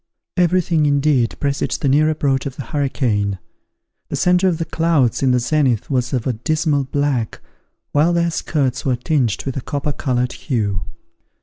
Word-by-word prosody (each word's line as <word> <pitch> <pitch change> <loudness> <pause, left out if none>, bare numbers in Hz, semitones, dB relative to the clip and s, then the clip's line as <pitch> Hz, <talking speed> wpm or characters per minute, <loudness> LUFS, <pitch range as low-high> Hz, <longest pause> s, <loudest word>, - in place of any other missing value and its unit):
Every 180 0 +3
thing, 160 -3 +1
indeed, 140 -4 +1
presaged 140 -1 -1
the - - +2
near 150 +3 +4
approach 140 -3 0
of 135 - -7
the 140 - -6
hurricane. 115 -8 -1 0.7
The - - -3
centre 180 +1 +3
of 175 -3 +1
the 165 - -2
clouds 160 -9 +1
in 135 - +3
the 125 - +3
zenith 130 -2 +1
was 125 -2 0
of 125 -5 -1
a 130 - 0
dismal 150 +3 0
black, 135 -4 -1 0.5
while 150 +4 +3
their 170 0 +1
skirts 135 -6 -1
were 130 -2 +1
tinged 125 - 0
with 135 0 -3
a - - -2
copper 145 +3 -3
coloured 125 -3 -1
hue. 105 -8 -2
140 Hz, 175 wpm, -19 LUFS, 125-155 Hz, 0.7 s, near